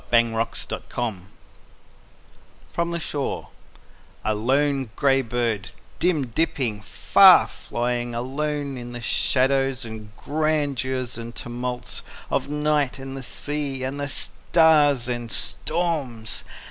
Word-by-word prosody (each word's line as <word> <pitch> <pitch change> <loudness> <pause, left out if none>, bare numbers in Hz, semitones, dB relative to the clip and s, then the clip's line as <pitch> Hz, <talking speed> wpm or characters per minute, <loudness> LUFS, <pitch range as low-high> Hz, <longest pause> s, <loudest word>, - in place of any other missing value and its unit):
Carl 115 -1 +3
Sandburg - - -5 0.2
OTHER 120 -2 +1
DAYS 90 -4 -13 1.5
FROM 170 0 -1
THE 170 0 -2
SHORE 145 -3 -3 0.8
A 110 - +2
LONE 135 +4 +1
gray 135 -1 +3
bird, 115 -4 -2 0.3
Dim 165 -6 +2
dipping, 125 -4 -1
far 100 - +7
flying, 120 0 -3
Alone 140 +2 -2
in 120 0 -8
the 120 - -6
shadows 135 +1 +1
and 110 -2 -8
grandeurs 140 -5 -1
and 115 +1 -7
tumults 125 +1 -3 0.3
Of - - 0
night 150 -3 +1
and 135 0 -7
the 135 - -5
sea 140 +1 -3
And 135 +2 -3
the 145 0 -2
stars 145 -5 +3
and 120 -2 -3
storms. 140 - -1
130 Hz, 120 wpm, -24 LUFS, 120-145 Hz, 1.5 s, far